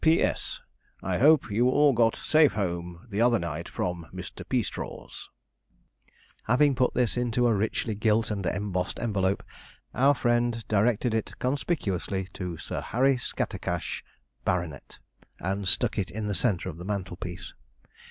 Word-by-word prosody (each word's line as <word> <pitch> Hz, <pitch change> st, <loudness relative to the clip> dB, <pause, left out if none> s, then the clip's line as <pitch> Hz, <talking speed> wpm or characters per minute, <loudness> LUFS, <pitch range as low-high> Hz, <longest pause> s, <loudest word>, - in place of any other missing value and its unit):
'P.S. 160 Hz, +1 st, +2 dB, 0.4 s
I 90 Hz, -1 st, 0 dB
hope 150 Hz, -4 st, +5 dB
you 120 Hz, +5 st, +3 dB
all 145 Hz, +1 st, +5 dB
got 115 Hz, -1 st, +3 dB
safe 155 Hz, -1 st, +4 dB
home 85 Hz, -3 st, -3 dB
the 100 Hz, +3 st, 0 dB
other 120 Hz, 0 st, +5 dB
night 85 Hz, -2 st, -4 dB
from 85 Hz, -2 st, -3 dB
Mr. -, -, -7 dB
Peastraw's.' -, -, -4 dB, 1.2 s
Having 140 Hz, +5 st, +4 dB
put 125 Hz, 0 st, +1 dB
this 125 Hz, -1 st, +1 dB
into 120 Hz, 0 st, +1 dB
a 120 Hz, -, +4 dB
richly 110 Hz, +2 st, 0 dB
gilt 110 Hz, +1 st, +1 dB
and 100 Hz, -2 st, -2 dB
embossed 90 Hz, 0 st, -2 dB
envelope, 100 Hz, -4 st, 0 dB, 0.5 s
our 140 Hz, +3 st, +4 dB
friend 120 Hz, -2 st, +1 dB
directed 110 Hz, +2 st, +2 dB
it 110 Hz, -1 st, -2 dB
conspicuously 105 Hz, -, -1 dB
to 90 Hz, -4 st, -5 dB
Sir -, -, -4 dB
Harry 135 Hz, +3 st, +2 dB
Scattercash, 125 Hz, -, -3 dB, 0.4 s
Bart., 85 Hz, -6 st, -2 dB, 0.4 s
and 95 Hz, +2 st, -2 dB
stuck 105 Hz, +5 st, +2 dB
it 95 Hz, -1 st, -1 dB
in 105 Hz, +3 st, -4 dB
the 105 Hz, -, -1 dB
centre 100 Hz, -4 st, 0 dB
of 85 Hz, -4 st, -5 dB
the 90 Hz, -, -8 dB
mantelpiece. 90 Hz, -3 st, -5 dB
105 Hz, 140 wpm, -27 LUFS, 95-120 Hz, 1.2 s, hope